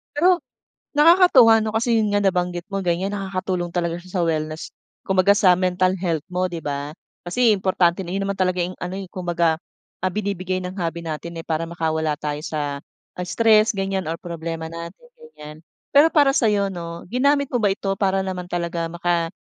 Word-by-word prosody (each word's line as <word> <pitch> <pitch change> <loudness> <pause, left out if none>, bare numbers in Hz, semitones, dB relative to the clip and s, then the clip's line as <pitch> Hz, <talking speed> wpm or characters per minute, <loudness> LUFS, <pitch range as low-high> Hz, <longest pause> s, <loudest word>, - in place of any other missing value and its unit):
Pero 350 +4 +4 0.6
nakakatuwa 295 -8 +7
no. 215 0 -1
Kasi 230 0 +2
yun 210 -1 0
nga 205 - +3
nabanggit 180 -2 0
mo 195 0 -2
ganyan. 180 +3 0
nakakatulong 185 -3 -3
talaga 170 -1 -1
siya 180 +1 -15
sa - - +2
wellness 155 -1 -3 0.3
kumbaga 190 +1 +3
sa 185 -3 +5
mental 185 0 +1
health 165 -5 -1
mo 185 +1 0
di 170 -2 -7
ba? 145 +1 -4 0.3
Kasi 235 +4 +3
importante 185 -2 +1
na 185 - -6
yun 195 +1 -1
naman 200 0 -2
talaga 185 -1 +1
yung 180 - -5
ano, 180 +2 -4
eh, - - -6
kumbaga, 170 -3 0 0.4
ah, 185 - +1
binibigay 190 -3 -2
ng 180 +1 -6
hobby 170 0 -2
natin, 165 +1 -6
eh. - - -10
Para 160 0 -1
makawala 160 -2 -1
tayo 150 0 -3
sa, 145 -3 -3 0.4
ah, 180 - -3
stress 220 +2 +4
ganyan 195 -1 -1
or 165 - -2
problema 165 -1 -5
natin 170 - -9
ganyan. 155 - -12 0.4
Pero 290 +3 +7
para 290 -4 +4
sa 230 - +3
'yo 200 -1 +1
no 170 -1 -7
ginamit 280 +6 +2
mo 245 - +1
ba 205 - +3
ito 195 0 -2
para 195 -1 +2
naman 180 -2 -5
talaga 170 -1 -2
maka 170 0 0
185 Hz, 190 wpm, -22 LUFS, 170-200 Hz, 0.6 s, nakakatuwa